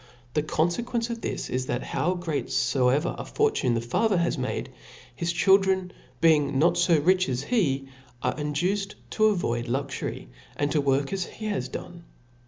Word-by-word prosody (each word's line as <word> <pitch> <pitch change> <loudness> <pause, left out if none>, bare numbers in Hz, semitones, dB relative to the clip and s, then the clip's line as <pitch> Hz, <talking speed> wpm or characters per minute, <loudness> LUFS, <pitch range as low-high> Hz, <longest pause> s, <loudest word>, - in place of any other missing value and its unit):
The 150 - +2
confcquence 230 +10 -1
of 230 -1 -5
this - - -3
is, 130 0 -2
that 120 - -2
how 180 +3 0
great 160 -8 -2
foever 130 +4 +2
a - - -3
fortune 420 - +1
the 115 - 0
father 195 - +1
has 170 -1 +1
made, 130 -1 -3 0.4
his 170 +4 -1
chiN 190 +3 +5
dren, 190 -1 0 0.3
being 150 -4 +4
not 170 +4 +4
fo 175 -1 +4
rich 185 +2 +3
as 130 +1 -1
he, 140 - 0 0.4
are - - 0
induced 180 +7 -1 0.2
to 215 - +2
avoid 120 - 0
luxury, 130 - -3 0.3
and 145 0 0
to 150 - +2
work 140 +3 +1
as 190 -2 -1
he 215 - -9
had 210 -2 -2
done. 170 -1 -8
165 Hz, 175 wpm, -26 LUFS, 135-190 Hz, 0.4 s, chiN